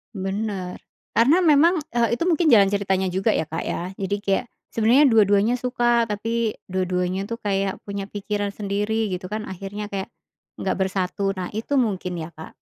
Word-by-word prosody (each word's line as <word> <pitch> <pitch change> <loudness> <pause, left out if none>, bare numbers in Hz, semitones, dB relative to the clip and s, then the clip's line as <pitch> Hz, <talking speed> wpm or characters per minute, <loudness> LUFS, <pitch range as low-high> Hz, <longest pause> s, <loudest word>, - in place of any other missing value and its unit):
Benar. 195 -1 -3 0.3
Karena 270 - +4
memang, 320 +2 +5
eee, 235 0 +2
itu 335 - -2
mungkin 330 0 +2
jalan 205 -8 +6
ceritanya 190 -2 +1
juga 190 +4 +1
ya, - - +1
Kak, 165 +2 -3
ya. 180 +2 -3
Jadi 195 +1 -1
kayak 200 +5 0 0.3
sebenernya 235 +6 +4
dua-duanya 210 +1 +4
suka, 240 -1 +2
tapi 225 +2 -1 0.2
dua-duanya 185 +1 -1
tuh 230 +1 -5
kayak 195 -1 -1
punya 200 -1 -4
pikiran 205 0 -3
sendiri 210 +2 -1
gitu 185 +1 -4
kan, 215 +2 -4
akhirnya 200 +3 -6
kayak 195 -1 -4 0.5
nggak 190 - -1
bersatu. 190 +1 -1
Nah, 180 -1 -4
itu 225 +6 -4
mungkin 195 -8 0
ya, 160 - -6
Kak. 160 +1 -11
205 Hz, 165 wpm, -23 LUFS, 190-230 Hz, 0.5 s, jalan